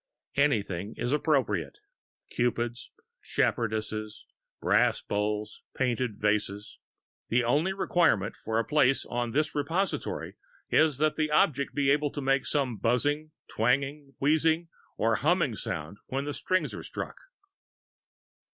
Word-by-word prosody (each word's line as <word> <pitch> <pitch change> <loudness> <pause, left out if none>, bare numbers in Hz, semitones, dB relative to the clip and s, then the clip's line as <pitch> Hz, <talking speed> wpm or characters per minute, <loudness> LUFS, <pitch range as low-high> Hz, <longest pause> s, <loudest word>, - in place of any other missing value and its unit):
Anything 105 -8 0
is 120 - -1
appropriate 135 - +1 0.5
cupids, 120 0 -1 0.3
shepherdesses, 110 -1 -1 0.3
brass - - +3
bowls, 105 +1 -2
painted 125 -4 0
vases. 105 -1 -1 0.5
The 120 +1 +3
only 145 +10 +2
requirement 170 - +2
for 110 0 -3
a 115 - +1
place 135 -3 +3
on 120 0 -2
this 150 +6 0
repository 165 +7 -2 0.3
is 155 -3 +4
that 155 +1 +1
the 155 -1 +1
object 140 -2 +2
be 140 -1 +3
able 145 +1 +2
to - - -4
make 135 0 +1
some 135 -6 0
buzzing, 145 +8 +1 0.2
twanging, 135 +4 0
wheezing, 160 +3 +2 0.3
or 115 0 +2
humming 165 -4 +2
sound 90 0 -5
when 135 +1 -2
the 145 0 -3
strings 185 +5 0
are - - -6
struck. - - -6
130 Hz, 125 wpm, -28 LUFS, 110-150 Hz, 0.5 s, is